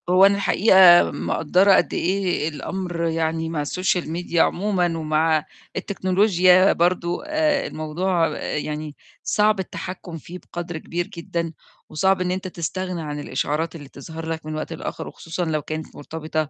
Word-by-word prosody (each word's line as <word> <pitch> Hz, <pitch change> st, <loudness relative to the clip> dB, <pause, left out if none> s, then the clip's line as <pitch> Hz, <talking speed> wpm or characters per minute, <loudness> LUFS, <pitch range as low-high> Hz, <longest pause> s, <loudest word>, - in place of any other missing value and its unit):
هو 185 Hz, +2 st, +7 dB
أنا 200 Hz, 0 st, +5 dB
الحقيقة 190 Hz, -2 st, +6 dB
مِقدَّرة 185 Hz, +5 st, +2 dB
قد -, -, +2 dB
إيه 180 Hz, -4 st, 0 dB
الأمر 175 Hz, +3 st, -4 dB
يعني 160 Hz, 0 st, -1 dB
مع 155 Hz, -3 st, -2 dB
الSocial 180 Hz, +2 st, 0 dB
Media 170 Hz, +2 st, -5 dB
عمومًا 180 Hz, -1 st, +2 dB
ومع 155 Hz, 0 st, +1 dB, 0.3 s
التكنولوجيا 185 Hz, -1 st, +3 dB
برضه 175 Hz, +2 st, 0 dB
آآ 305 Hz, -2 st, +1 dB
الموضوع 165 Hz, +2 st, 0 dB
يعني 150 Hz, 0 st, -4 dB, 0.3 s
صعب 210 Hz, -1 st, +2 dB
التحكُم 180 Hz, -2 st, -6 dB
فيه 175 Hz, +4 st, -10 dB
بقدر 175 Hz, -1 st, -6 dB
كبير 175 Hz, +2 st, -4 dB
جدًا 170 Hz, -3 st, -4 dB, 0.4 s
وصعب 190 Hz, +4 st, +2 dB
إن 180 Hz, 0 st, 0 dB
أنت 185 Hz, +1 st, -3 dB
تستغنى 180 Hz, 0 st, -4 dB
عن 150 Hz, -1 st, -5 dB
الإشعارات 150 Hz, +4 st, -2 dB
اللي 145 Hz, -4 st, -10 dB
تظهر 160 Hz, +4 st, -8 dB
لك 160 Hz, -1 st, -4 dB
من 155 Hz, 0 st, -4 dB
وقت 155 Hz, -, -4 dB
لآخِر -, -, -6 dB
وخصوصًا 170 Hz, +2 st, -5 dB
لو 155 Hz, -2 st, -1 dB
كانت 155 Hz, +1 st, -6 dB
مرتبطة 155 Hz, 0 st, -4 dB
170 Hz, 145 wpm, -22 LUFS, 160-185 Hz, 0.4 s, هو